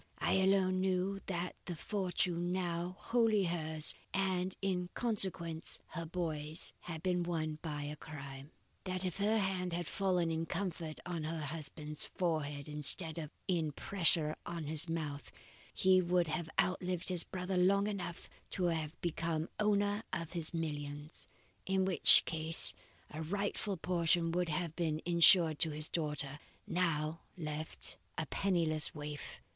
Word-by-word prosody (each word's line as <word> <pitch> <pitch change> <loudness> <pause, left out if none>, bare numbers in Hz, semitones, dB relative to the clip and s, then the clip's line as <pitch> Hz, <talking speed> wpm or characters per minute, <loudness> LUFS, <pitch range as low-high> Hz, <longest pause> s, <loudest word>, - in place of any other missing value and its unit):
I - - +1
alone 190 -1 +3
knew 190 +1 0
that 180 -1 -3
the 175 - -4
fortune 180 -2 -1
now 175 -1 -2
wholly 225 -4 +2
hers, 160 -3 +1 0.2
and 190 -1 0
in 180 -2 -1
consequence 180 -8 +1
her 170 -2 -5
boy's, 160 -2 -1
had 160 -2 -7
been 180 -1 +1
won 160 -3 -2
by 150 -3 -4
a 145 +1 -4
crime. 140 -2 -9 0.4
That 185 0 -1
if 180 -1 -3
her 210 +2 +2
hand 185 -3 -1
had 175 0 -2
fallen 180 -2 0
in 165 0 -2
comfort 170 -4 -3
on 175 -3 -3
her 160 0 -3
husband's 150 0 -4
forehead 150 -5 -2
instead 150 +3 +5
of 155 -2 -5 0.2
in 165 -5 0
pressure 165 -3 +2
on 170 -2 -5
his 155 +2 +1
mouth, 150 -3 -4 0.4
he 185 0 +4
would 175 0 +2
have 160 +1 -2
outlived 180 -1 0
his 180 -2 +1
brother 185 0 -4
long 195 +3 +4
enough 180 -5 -4 0.3
to 185 - 0
have 160 0 -4
become 165 -1 -1
owner 205 0 +2
of 165 -2 -3
his 165 -3 -3
millions; 145 -2 -3 0.4
in 190 0 +2
which 190 -2 +7
case 160 0 +2 0.4
a 155 - -5
rightful 200 +3 -2
portion 170 -1 +1
would 175 0 0
have 165 0 -2
been 160 -3 -1
insured 170 -2 +7
to 165 - +5
his 155 0 -1
daughter, 150 -3 -1 0.3
now 165 -2 0 0.2
left 155 -1 -5 0.2
a 160 - -1
penniless 160 -4 0
waif. 150 0 -7
170 Hz, 145 wpm, -34 LUFS, 155-185 Hz, 0.4 s, which